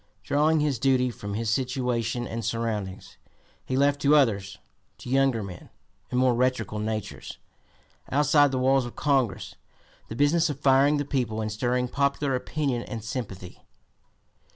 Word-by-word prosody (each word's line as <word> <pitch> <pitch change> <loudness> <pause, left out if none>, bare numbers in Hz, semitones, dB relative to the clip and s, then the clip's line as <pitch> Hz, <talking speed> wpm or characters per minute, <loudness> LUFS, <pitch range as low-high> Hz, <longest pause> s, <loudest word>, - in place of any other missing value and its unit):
Drawing 155 +2 +2
his 145 -5 0
duty 125 -1 +2
from 100 -2 -6
his 110 0 -1
situation 125 -2 -1
and 115 0 -5
surroundings, 105 -4 -4 0.5
he 130 - -2
left 140 +1 +2
to 145 +2 +5
others, 100 -9 +1 0.4
to 125 - -8
younger 135 -4 +2
men 90 -3 -10 0.4
and 125 - 0
more 130 -1 +4
rhetorical 120 -4 0
natures, 110 -1 -5 0.7
outside 145 +1 +4
the 130 - -2
walls 130 0 +2
of 120 - -11
Congress, 135 -9 0 0.5
the 110 - -7
business 155 +5 +3
of 145 -2 -4
firing 140 +1 +4
the 145 - -2
people 120 -6 -2
and 110 -1 -2
stirring 125 +3 0
popular 140 +1 0
opinion 130 -1 -2
and 115 -3 -7
sympathy. 105 -6 -6
125 Hz, 150 wpm, -26 LUFS, 115-140 Hz, 0.7 s, to